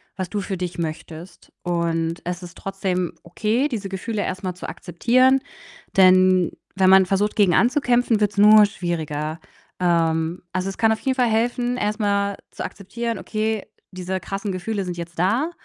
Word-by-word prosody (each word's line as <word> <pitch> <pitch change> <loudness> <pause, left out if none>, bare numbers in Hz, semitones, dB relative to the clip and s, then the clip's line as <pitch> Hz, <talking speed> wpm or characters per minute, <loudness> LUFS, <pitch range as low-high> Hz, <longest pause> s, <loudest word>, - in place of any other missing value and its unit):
was 185 -2 -4
du 205 - -2
für 190 -1 -4
dich 180 -1 -4
möchtest 165 +1 -7
und 170 -1 -1
es 180 +1 -4
ist 175 - -11
trotzdem 190 -2 -2
okay, 220 - 0
diese 215 -7 -4
Gefühle 205 +2 -3
erst 185 +1 -4
mal 185 -1 -2
zu 180 - -8
akzeptieren. 255 +9 +2 0.6
Denn 185 -1 +5 0.2
wenn 190 -1 +4
man 190 0 +7
versucht, 200 +3 0
gegen 195 -5 +4
anzukämpfen, 245 -3 +2
wird 205 -1 +2
's 205 - -18
nur 210 +1 +8
schwieriger. 160 -4 -4 0.4
Ähm, 165 -1 +1
also, 185 +1 -1
es 195 - -7
kann 225 -1 +3
auf 220 - 0
jeden 265 -1 0
Fall 250 -2 +2
helfen, 240 +2 0
erst 210 -1 -1
mal 200 -1 0
zu - - -6
akzeptieren: 230 +4 -5
„Okay, 220 -1 -2 0.3
diese 185 0 -4
krassen 195 +3 -4
Gefühle 195 +3 -3
sind 175 -1 -5
jetzt 170 0 -7
da.“ 235 - +1
195 Hz, 175 wpm, -22 LUFS, 175-220 Hz, 0.6 s, nur